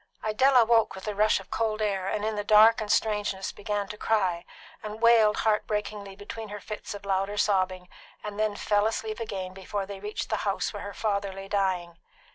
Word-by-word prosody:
Idella 245 +3 +4
woke 225 -2 +3
with 190 - -9
the 210 - -3
rush 210 +1 +3
of 195 - -14
cold 220 -1 -1
air, 195 -3 -1
and 210 +1 -1
in 220 0 -1
the 205 - -2
dark 215 +2 +6
and 215 -1 -2
strangeness 205 -3 0
began 205 -1 -3
to 210 - -7
cry, 185 -6 0 0.4
and 215 0 -7
wailed 230 -2 +5
heart 215 -1 +1
breakingly 210 -2 -4
between 210 +2 -8
her 210 0 -6
fits 210 0 -7
of 200 - -10
louder 195 +1 -1
sobbing, 185 -3 +1 0.4
and 210 0 -6
then 215 -1 +1
fell 205 +1 +2
asleep 220 0 -3
again 190 -5 -5
before 195 +1 -4
they 195 0 -8
reached 210 +2 -5
the - - +1
house 200 +1 -1
where 205 - -6
her 200 0 -7
father 200 -3 -1
lay 195 +1 -8
dying. 185 -4 -1
205 Hz, 205 wpm, -27 LUFS, 195-215 Hz, 0.4 s, dark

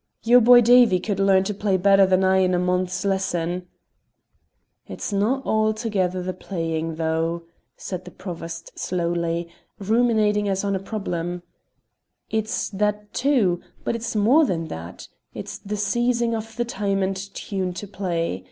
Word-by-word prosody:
"Your 245 +2 +6
boy 240 +1 +8
Davie 240 -5 +6
could 200 0 -3
learn 195 -1 +4
to 210 +2 -2
play 195 -1 0
better 195 +1 +5
than 185 0 +3
I 190 0 +4
in 185 -1 +2
a - - +2
month's 180 +2 -1
lessons." 180 -2 -1 1.2
"It's - - -5
no' 230 +7 +1
altogether 215 -4 0
the 185 +1 -3
playing 165 -3 -3
though," 165 +1 -1 0.3
said 185 -1 -6
the - - -8
Provost 170 -2 -8
slowly, 170 -1 -1 0.3
ruminating 210 -1 +2
as 195 0 -1
on 200 -1 0
a - - -1
problem; 180 -4 -4 0.9
"it's 220 -1 -1
that 210 +1 -2
too, 240 -11 +2 0.2
but - - -1
it's 230 -1 -4
more 240 +10 +5
than 165 - -1
that; 85 +1 -8 0.3
it's - - -7
the 210 +1 -5
seizing 235 +3 +1
of 225 0 -5
the 240 - 0
time 200 -3 -1
and 190 +1 -1
tune 195 -1 -4
to 205 +3 -7
play. 170 - -2
195 Hz, 150 wpm, -23 LUFS, 180-215 Hz, 1.2 s, boy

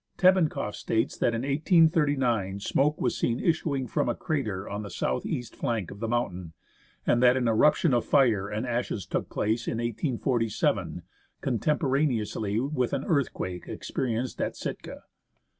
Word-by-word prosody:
Tebenkoff 180 - +3
states 110 0 -1
that 115 - +1
in 115 - -2
1839 140 - +2
smoke 145 +8 +1
was - - 0
seen 120 +1 0
issuing 150 -5 0
from 120 - 0
a 120 - 0
crater 105 -11 -2
on 105 +1 -4
the 105 - -7
south 65 - -2
east 120 -1 -4
flank 110 -6 -2
of 100 - -10
the 115 - -2
mountain, 95 -8 -2 0.5
and 120 - +3
that 125 0 +6
an 125 -2 +1
eruption 145 +6 +4
of 120 - +2
fire 115 -9 +3
and 110 +3 -3
ashes 120 -6 -2
took - - -3
place 110 +3 -1
in - - -1
1847, 120 -1 -1 0.4
contemporaneously 125 -5 0
with 130 -1 -1
an 140 -1 -1
earthquake 110 - -1
experienced 125 0 -3
at - - -2
Sitka. - - -6
120 Hz, 150 wpm, -27 LUFS, 110-140 Hz, 0.5 s, that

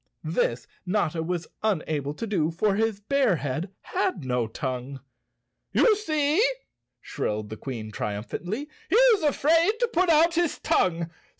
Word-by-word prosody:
This - - 0 0.2
Notta 180 -4 0
was 175 +1 -2 0.2
unable 155 -8 -1
to 230 - -4
do, 180 -8 0
for 195 +5 +1
his 220 0 0
bear 255 -1 +2
head 145 +5 -3
had 375 - -2
no 125 -2 0
tongue. 130 +3 -4 0.7
"You 445 - +5
see!" 310 -2 +1 0.6
shrilled 105 0 -3
the - - -4
Queen 115 -5 -6
triumphantly, 175 - -4 0.2
"he - - +2
is 475 -4 +6
afraid 325 +5 +3
to 485 - +2
put 360 +1 +3
out 330 +1 +5
his 345 -2 +1
tongue. 170 -2 +1
200 Hz, 140 wpm, -26 LUFS, -, 0.7 s, is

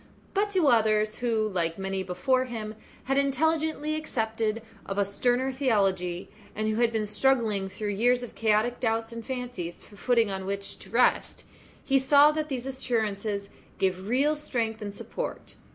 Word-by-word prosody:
But 410 +1 +1
to 370 -6 +2
others 215 -3 +3
who, 225 -3 +1
like 170 -4 -1
many 195 0 -2
before 190 +9 +1
him, 220 -3 -5 0.3
had 270 +1 +1
intelligently 310 +2 +1
accepted 225 -7 -2 0.2
of 195 - -5
a 200 - +3
sterner 245 +6 +1
theology, 195 -9 0 0.3
and 215 +1 -1
who 215 0 0
had 235 -1 +3
been 220 -2 -1
struggling 215 -4 +1
through 210 +2 -4
years 245 +5 +2
of 245 - -8
chaotic 220 +2 +1
doubts 225 -1 0
and 230 0 -7
fancies 245 -9 -5
for 205 - -17
footing 230 -2 +2
on 190 0 -4
which 200 0 -4
to - - -13
rest, 245 +2 +2 0.4
he 270 -1 +4
saw 285 +3 +6
that 310 0 -3
these 255 -3 -3
assurances 215 -6 -2 0.3
gave 190 0 -1
real 275 +6 +2
strength 230 -7 -2
and 205 -1 -5
support. - - -6
225 Hz, 165 wpm, -27 LUFS, 205-260 Hz, 0.4 s, saw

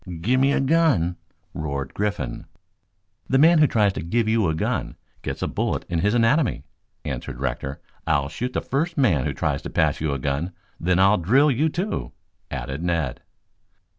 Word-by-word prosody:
"Gimme 130 +7 +3
a - - +2
gun!" 135 - +2 0.4
roared 70 -3 -4
Griffin. 100 -12 -3 0.8
"The 135 - +3
man 165 +4 +6
who 150 - +6
tries 105 -6 +2
to - - -4
give 110 +7 0
you 110 -3 +2
a 80 - 0
gun 80 - -2 0.3
gets - - -4
a - - 0
bullet - - -2
in 85 - 0
his 105 +6 +2
anatomy," 120 - +2 0.4
answered 60 - -5
Rector. 70 +1 -3 0.3
"I'll 70 -1 +2
shoot 125 - -4
the - - 0
first 160 +6 -2
man 90 - +3
who - - -2
tries - - -1
to - - -6
pass - - +1
you 75 -2 0
a 70 - -1
gun; 70 +7 -2 0.3
then 90 +1 +1
I'll 100 +2 +5
drill 135 - +4
you, 145 +6 +2
too," 185 +7 -3 0.4
added 65 +4 -4
Ned. 85 -7 -1
100 Hz, 175 wpm, -23 LUFS, -, 0.8 s, man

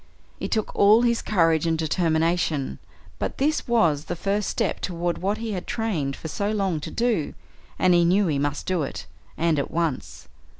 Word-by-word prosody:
It - - -3
took 220 -2 -1
all 215 +4 +6
his 235 -1 +2
courage 165 -5 +2
and 165 -1 +1
determination, 160 -2 0 0.4
but - - -3
this 295 +2 0
was 170 -11 +2
the 175 - -3
first 200 +4 -1
step - - -1
toward 175 -1 -2
what 200 +3 -1
he 225 0 -4
had 185 -3 -5
trained 170 -12 -2
for - - -7
so 200 +6 -2
long 195 -6 0
to 150 - -6
do, 230 -10 -1 0.4
and 185 -1 +4
he 175 0 +5
knew 190 +4 +3
he 150 -5 0
must 145 0 -2
do 185 -3 0
it, 135 - -5 0.3
and 165 -3 +2
at 140 - -2
once. 165 -5 -3
175 Hz, 185 wpm, -24 LUFS, 160-210 Hz, 0.4 s, all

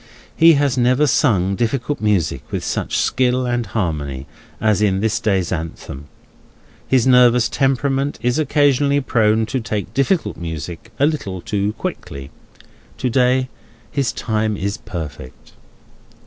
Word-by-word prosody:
He 165 +1 +7
has 140 -3 +1
never 125 +4 +3
sung 105 -7 +2
difficult 120 +5 -2
music 105 -6 0
with - - -3
such - - -2
skill 125 0 +1
and 120 -1 -1
harmony, 75 - -3 0.3
as 105 -2 +2
in 95 -3 +2
this 110 +1 0
day's 95 -5 0
Anthem. 80 -4 -6 0.8
His 130 -3 +3
nervous 125 -2 +5
temperament 135 +1 0
is 125 +4 0
occasionally 145 -1 +2
prone 110 -4 +2
to 130 +4 -2
take 105 -5 -4
difficult 140 +7 0
music 85 +4 -7
a 140 - +4
little 135 -12 -2
too 100 +3 -2
quickly; 70 -8 -6 0.7
to 125 -2 -1
day, 130 +1 +2 0.4
his 135 -5 0
time 110 -2 -1
is 100 +1 -2
perfect. 75 -7 -8
115 Hz, 135 wpm, -19 LUFS, 95-130 Hz, 0.8 s, He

